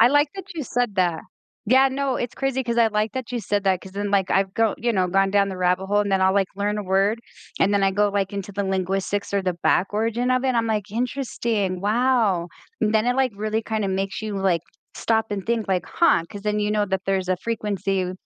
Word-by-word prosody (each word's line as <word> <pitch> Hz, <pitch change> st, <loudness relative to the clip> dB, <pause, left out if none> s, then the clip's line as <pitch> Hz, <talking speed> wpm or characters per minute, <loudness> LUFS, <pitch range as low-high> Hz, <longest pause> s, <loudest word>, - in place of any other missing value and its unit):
I 230 Hz, -, +8 dB
like 290 Hz, +1 st, +3 dB
that 385 Hz, -2 st, -7 dB
you 310 Hz, -, -3 dB
said 245 Hz, -4 st, -1 dB
that. 175 Hz, -3 st, +1 dB, 0.5 s
Yeah. 265 Hz, +4 st, +5 dB
No. 270 Hz, -1 st, -1 dB
It's 240 Hz, -, -4 dB
crazy 270 Hz, -1 st, -1 dB
'cause 235 Hz, -1 st, -1 dB
I 230 Hz, -, +6 dB
like 215 Hz, 0 st, -1 dB
that 260 Hz, -2 st, -5 dB
you 240 Hz, -, -1 dB
said 205 Hz, 0 st, -1 dB
that 190 Hz, -2 st, +2 dB
'cause 190 Hz, -, -12 dB
then, 205 Hz, 0 st, -3 dB
like, 195 Hz, -2 st, +1 dB
I've 195 Hz, 0 st, +1 dB
go 225 Hz, -2 st, +2 dB
you 235 Hz, 0 st, 0 dB
know, 185 Hz, -3 st, +2 dB
gone 195 Hz, +1 st, +2 dB
down 200 Hz, 0 st, +3 dB
the 190 Hz, -, -5 dB
rabbit 180 Hz, +1 st, +1 dB
hole, 205 Hz, +1 st, +2 dB
and 205 Hz, -, -1 dB
then 195 Hz, -1 st, +2 dB
I'll, 190 Hz, 0 st, +4 dB
like, 195 Hz, -2 st, +3 dB
learn 205 Hz, +1 st, -1 dB
a -, -, -2 dB
word. 195 Hz, +4 st, +1 dB, 0.4 s
And 200 Hz, +1 st, +3 dB
then 200 Hz, -, +2 dB
I 195 Hz, -, +4 dB
go, 205 Hz, +1 st, +2 dB
like, 200 Hz, -1 st, -1 dB
into 200 Hz, 0 st, -5 dB
the 200 Hz, 0 st, -2 dB
linguistics 190 Hz, +1 st, -1 dB
or 200 Hz, -, +1 dB
the 185 Hz, -2 st, -1 dB
back 190 Hz, -, +3 dB
origin 230 Hz, +4 st, 0 dB
of 255 Hz, +1 st, +1 dB
it, 260 Hz, -2 st, +1 dB
I'm 230 Hz, -1 st, +1 dB
like, 210 Hz, -2 st, -2 dB
"Interesting, 230 Hz, -5 st, -2 dB
wow!" 215 Hz, -4 st, +2 dB, 0.3 s
And 215 Hz, +1 st, +1 dB
then 220 Hz, +2 st, +3 dB
it, 250 Hz, +1 st, +1 dB
like, 265 Hz, -4 st, +2 dB
really 215 Hz, +1 st, -1 dB
kinda 215 Hz, -3 st, -2 dB
makes 195 Hz, +2 st, -2 dB
you, 210 Hz, -2 st, -3 dB
like, 185 Hz, -4 st, +1 dB, 0.3 s
stop 225 Hz, -1 st, +1 dB
and 200 Hz, -2 st, -3 dB
think, 230 Hz, -3 st, -1 dB
like, 185 Hz, -2 st, 0 dB
"Huh," 335 Hz, -, +3 dB
'cause 205 Hz, -, -8 dB
then 210 Hz, 0 st, 0 dB
you 210 Hz, 0 st, 0 dB
know 210 Hz, -1 st, +1 dB
that 190 Hz, -1 st, -2 dB
there's 190 Hz, -1 st, 0 dB
a 185 Hz, -, +2 dB
frequency 195 Hz, -3 st, -2 dB
205 Hz, 250 wpm, -23 LUFS, 195-230 Hz, 0.5 s, I